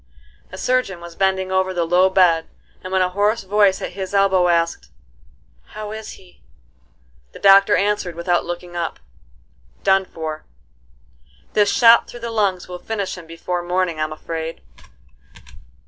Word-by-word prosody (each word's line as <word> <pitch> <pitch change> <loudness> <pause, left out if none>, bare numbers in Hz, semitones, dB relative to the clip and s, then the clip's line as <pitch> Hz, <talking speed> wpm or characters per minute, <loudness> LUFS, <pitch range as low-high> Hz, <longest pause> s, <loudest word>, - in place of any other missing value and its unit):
A - - -8
surgeon 250 -8 0
was 170 -1 -11
bending 190 -1 0
over 190 0 0
the 170 -1 0
low 180 +3 +3
bed, 175 -4 +3 0.4
and 185 - -7
when 190 -1 +2
a 180 - 0
hoarse 205 +4 0
voice 200 0 +2
at - - -4
his 190 +1 -5
elbow 190 -2 +3
asked: 170 -1 0 0.9
"How 210 -1 -6
is 220 0 -7
he?" 180 -2 -19 0.9
The - - -11
doctor 195 +1 +6
answered 200 -4 -1
without 175 +1 0
looking 175 0 -7
up: 170 -1 -3 0.8
"Done 190 0 +3
for: 155 -3 -6 1.1
this 205 -1 +3
shot 230 -1 +6
through 240 - -11
the 235 0 -4
lungs 200 -5 0
will 180 0 -8
finish 200 0 -4
him 175 -3 -12
before 175 +2 -4
morning 175 -2 -1
I'm 155 0 -2
afraid." 160 +1 -6
185 Hz, 150 wpm, -20 LUFS, 175-200 Hz, 1.1 s, doctor